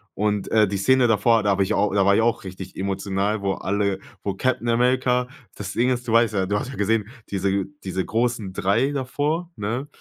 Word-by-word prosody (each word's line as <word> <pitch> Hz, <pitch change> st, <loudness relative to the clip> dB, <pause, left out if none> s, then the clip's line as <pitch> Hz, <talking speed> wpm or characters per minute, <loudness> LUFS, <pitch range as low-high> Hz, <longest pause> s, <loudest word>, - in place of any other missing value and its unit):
Und, 105 Hz, -1 st, -1 dB
äh, 110 Hz, -2 st, +4 dB
die 100 Hz, +1 st, -2 dB
Szene 130 Hz, +5 st, +4 dB
davor, 115 Hz, +1 st, +3 dB
da 105 Hz, -, +1 dB
habe 95 Hz, 0 st, +2 dB
ich 95 Hz, -, -1 dB
auch 105 Hz, 0 st, +2 dB
da 100 Hz, -1 st, +3 dB
war 100 Hz, 0 st, +5 dB
ich -, -, +3 dB
auch 115 Hz, -2 st, +1 dB
richtig 95 Hz, 0 st, -8 dB
emotional, 100 Hz, +2 st, -1 dB
wo 100 Hz, -1 st, 0 dB
alle 100 Hz, 0 st, -1 dB, 0.3 s
wo 100 Hz, -1 st, -2 dB
Captain 120 Hz, +2 st, 0 dB
America 125 Hz, +1 st, +2 dB, 0.3 s
das 95 Hz, -2 st, -6 dB
Ding 125 Hz, +2 st, +2 dB
ist, 125 Hz, -1 st, -2 dB
du -, -, -1 dB
weißt 115 Hz, -1 st, +4 dB
ja. 95 Hz, -1 st, +1 dB
Du 105 Hz, +2 st, 0 dB
hast 130 Hz, -, -5 dB
ja 135 Hz, -, -7 dB
gesehen, 105 Hz, 0 st, +1 dB, 0.2 s
diese 100 Hz, 0 st, 0 dB, 0.2 s
diese 95 Hz, -1 st, -2 dB
großen 115 Hz, -4 st, -1 dB
3 105 Hz, +9 st, +1 dB
davor, 145 Hz, +5 st, -2 dB
ne, 115 Hz, +7 st, -3 dB
105 Hz, 215 wpm, -23 LUFS, 100-125 Hz, 0.3 s, war